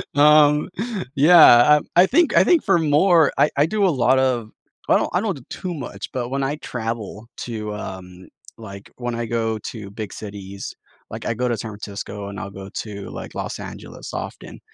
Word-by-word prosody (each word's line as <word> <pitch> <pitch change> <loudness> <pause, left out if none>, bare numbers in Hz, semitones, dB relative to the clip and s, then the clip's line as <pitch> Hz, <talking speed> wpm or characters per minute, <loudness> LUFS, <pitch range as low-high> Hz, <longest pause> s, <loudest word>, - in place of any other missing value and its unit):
Um, 150 +1 +5 0.5
yeah, 155 +4 +8 0.3
uh, 150 - +1 0.2
I 180 - +8
think 335 - +2
I - - +7
think 345 -3 +4
for 195 -4 +3
more, 160 +1 +4
I 150 - +4
I 145 - +4
do 205 +4 0
a - - +4
lot 130 -3 +2
of 125 -4 0 0.4
I - - +5
don't - - -1
I 180 - +2
don't 205 -4 -1
do 130 - -13
too 180 -1 -5
much, 145 -6 -7
but 120 -2 -3
when 135 +1 -2
I 135 +2 -1
travel 115 -4 -5 0.2
to, 110 -3 -5
um 95 -2 -9 0.3
like, 100 -3 -10
when 120 -1 -4
I 120 0 -3
go 115 -1 -1
to 105 -4 -9
big 105 0 -6
cities, 100 -2 -8 0.4
like, - - -7
I - - 0
go 125 +2 -1
to 120 -2 -1
San 110 +1 -6
Francisco 100 -1 -7
and 100 0 -7
I'll 105 -2 -6
go 95 0 -10
to, 100 -2 -6
like, - - -8
Los - - -5
Angeles - - -9
often. - - -7
120 Hz, 200 wpm, -21 LUFS, 105-150 Hz, 0.5 s, yeah